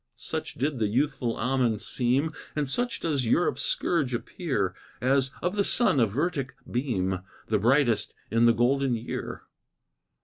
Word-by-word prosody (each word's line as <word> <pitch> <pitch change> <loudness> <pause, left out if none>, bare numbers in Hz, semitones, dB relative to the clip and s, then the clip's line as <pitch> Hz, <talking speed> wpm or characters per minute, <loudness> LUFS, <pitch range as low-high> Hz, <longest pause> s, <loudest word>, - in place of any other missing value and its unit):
Such - - -5
did 140 0 -1
the 110 - +2
youthful 125 0 0
Ammon 125 -2 +1
seem, 135 +8 +1 0.2
And 150 -2 0
such 245 - -2
does 140 -7 0
Europe's 175 +9 +2
scourge 175 - 0
appear, 120 - -2 0.3
As, 130 +2 +2
of 180 +3 0
the 200 - +3
sun, 195 - +3
a 115 - +4
vertic 140 - -2
beam, 95 -8 -1 0.3
The 110 -1 +2
brightest 120 -1 +2 0.2
in 115 +1 +4
the 115 - +6
golden 125 +2 +2
year. 115 +1 -5
130 Hz, 145 wpm, -27 LUFS, 115-150 Hz, 0.3 s, the